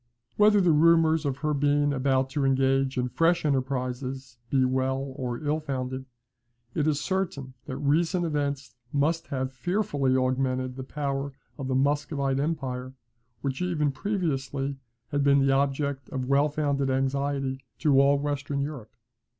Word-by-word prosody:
Whether 210 -1 +5
the 180 -2 +4
rumours 160 0 +4
of 135 -1 -2
her 150 - +2
being 145 0 +2
about 130 0 +1
to 145 0 -1
engage 135 0 +2
in 125 0 +1
fresh 165 +4 +2
enterprises 130 -2 -2
be 130 -2 +3
well 130 +1 -1
or 125 0 -4
ill 150 +1 0
founded, 130 -3 -4 0.7
it 150 - 0
is 150 -2 +2
certain 145 -6 -2
that 130 -2 -5
recent 165 +5 +1
events 145 -3 -2 0.2
must 160 +4 0
have 130 -2 -3
fearfully 140 - 0
augmented 130 0 0
the 130 - -6
power 140 0 -3 0.3
of 135 - -3
the 130 - 0
Muscovite 140 0 +1
empire, 130 -4 -3 0.5
which, 135 +3 -3
even 160 -5 +1
previously, 140 -6 -2 0.3
had 145 -1 +1
been 140 0 +5
the 135 -1 +3
object 140 0 0
of 130 -1 -3
well 140 +3 +3
founded 140 -2 0
anxiety 135 0 -1
to 140 -4 +4
all 140 +1 +4
Western 145 0 -2
Europe. 140 -7 -5
140 Hz, 150 wpm, -27 LUFS, 130-150 Hz, 0.7 s, Whether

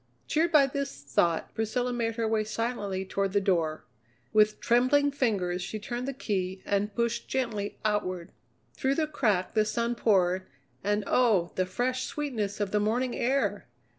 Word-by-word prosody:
Cheered 330 +2 +2
by 300 -4 +7
this 275 - -4
thought, 165 +4 +1
Priscilla 245 +3 -1
made 230 -2 -1
her 230 -1 0
way 220 -1 +1
silently 210 -3 -2
toward 195 0 -1
the 200 - +4
door. 165 -5 0 0.5
With 215 0 +4
trembling 255 +4 +3
fingers 195 -10 0
she 215 - -4
turned 240 +4 -4
the - - 0
key 190 -7 -3
and 205 0 0
pushed 235 -1 -1
gently 220 -6 -2
outward. 185 -5 -1 0.4
Through 270 +1 0
the 315 - +1
crack 215 -11 0
the 215 - +4
sun 235 +2 -1
poured, 185 -5 +2 0.4
and 205 +1 +1
oh, 210 -9 +3
the 185 0 0
fresh 250 +6 -1
sweetness 225 -9 -3
of 205 -2 -1
the 210 - +2
morning 240 +4 0
air! 270 +3 0
215 Hz, 165 wpm, -28 LUFS, 195-250 Hz, 0.5 s, by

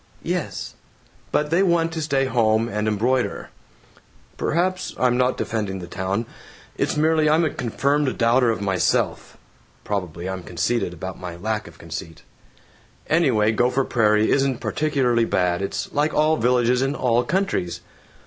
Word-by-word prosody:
("Yes!) - - -3 0.6
But 150 0 0
they 170 +3 +3
want 170 -3 +2
to 160 0 -4
stay 140 -3 +1
home 115 -3 +2
and 105 -1 -2
embroider." 120 +5 0 0.8
"Perhaps. 180 +3 -1
I'm 125 -1 +2
not 125 +1 +1
defending 105 -4 -2
the 90 - -7
town. 95 +5 -2 0.5
It's - - -1
merely 155 0 +3
I'm 160 +2 +3
a 155 - 0
confirmed 140 +4 0
doubter 120 +1 +3
of 110 - -1
myself. 95 -3 0 0.5
(Probably 90 -4 -4
I'm 95 0 -4
conceited 90 +5 -1
about 95 +2 -7
my 90 -2 -6
lack 110 +4 -3
of 85 -1 -14
conceit!) 80 -1 -8 0.8
Anyway, 125 -10 +3
Gopher 125 +4 +1
Prairie 105 -2 +2
isn't 135 -2 +2
particularly 130 -5 +1
bad. 90 -3 0
It's 100 - -4
like 150 +2 +1
all 155 +1 +3
villages 125 -1 +2
in 135 +2 0
all 120 -2 +2
countries. 120 - -1
120 Hz, 145 wpm, -22 LUFS, 100-145 Hz, 0.8 s, they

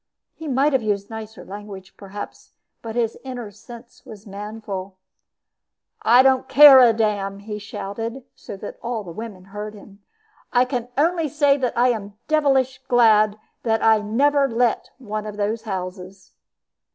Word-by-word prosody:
He 320 - -9
might 275 +2 +2
have 265 - +2
used 205 -1 -2
nicer 220 0 -8
language, 195 -1 -10
perhaps, 200 +1 -10 0.3
but 225 -1 -7
his 230 -2 -1
inner 245 -5 -7
sense 235 +3 -14
was 210 -2 -12
manful. 200 -2 -7 1.0
"I 245 +3 +6
don't 265 -1 +3
care 275 0 +9
a 245 -2 +7
damn," 205 -3 -1
he 210 +1 -7
shouted, 225 +5 -6
so - - -9
that 205 - -9
all 235 -2 -3
the 175 - -9
women 205 0 -8
heard 210 +2 -8
him. 200 0 -15 0.5
"I 250 0 +4
can 250 -2 -3
only 330 +1 +1
say 285 -1 +2
I 245 +2 +3
am 205 -3 -4
devilish 270 -4 +1
glad 215 -4 +4 0.2
that 225 -2 0
I 220 -1 +5
never 275 +7 +2
let 235 0 0
one 215 -4 -5
of 210 -1 -7
those 210 +2 -1
houses." 185 -2 -7
220 Hz, 150 wpm, -22 LUFS, 205-255 Hz, 1.0 s, care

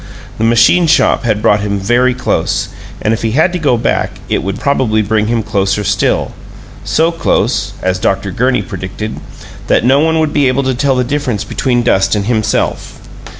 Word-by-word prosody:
The - - 0
machine 120 +10 +4
shop 150 - +2
had 110 -2 0
brought 105 - +3
him 100 0 -2
very 120 +6 +1
close, 125 - -1 0.3
and 110 - +1
if 115 - -3
he 110 -1 -1
had 160 +6 +2
to 180 - -2
go 140 -7 +2
back - - 0 0.2
it - - 0
would 100 +1 -4
probably 120 -6 +1
bring 105 +1 0
him 115 -1 0
closer 100 -1 -1
still; 100 0 0 0.5
so 165 +1 +1
close 165 0 -1
as 95 0 0
Dr. 100 0 -1
Gurney 125 +1 0
predicted 100 0 -6 0.5
that - - +2
no 135 +3 +4
one 160 +1 +2
would 155 -1 0
be 145 -2 +2
able 130 +2 +1
to 130 0 0
tell 135 +2 0
the 125 - +1
difference 125 -5 -2
between 120 -2 -1
dust 95 -3 +2
and 100 -1 -2
himself. 110 -2 -1
120 Hz, 190 wpm, -13 LUFS, 105-135 Hz, 0.5 s, machine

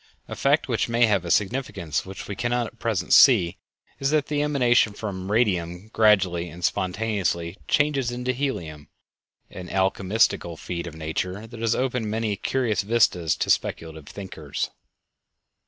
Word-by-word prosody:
A - - -6
fact 145 +3 +2
which 115 -3 0
may 120 +1 +4
have 100 -5 +1
a - - -4
significance 95 - -1
which 95 0 -8
we 100 - -5
cannot 120 +2 0
at 115 +1 -11
present 105 -6 -1
see 100 -11 +6 0.4
is 135 - +1
that 150 -1 +1
the 145 -1 0
emanation 125 -7 +3
from 100 -2 -5
radium 95 -4 0
gradually 95 -6 +3
and 85 +2 -5
spontaneously 95 -4 -1
changes 145 -4 +2
into 125 +1 -2
helium, 95 - -4 0.6
an 90 -1 -8
alchemistical 95 -2 +1
feat 85 0 -5
of 80 - -8
nature 90 +6 -4
that 115 0 -11
has 115 0 +1
opened 125 -4 -1
many 110 -1 -1
curious 110 -2 0
vistas 100 -7 +2
to - - 0
speculative 80 -3 -2
thinkers. 85 -7 -5
105 Hz, 150 wpm, -24 LUFS, 90-120 Hz, 0.6 s, see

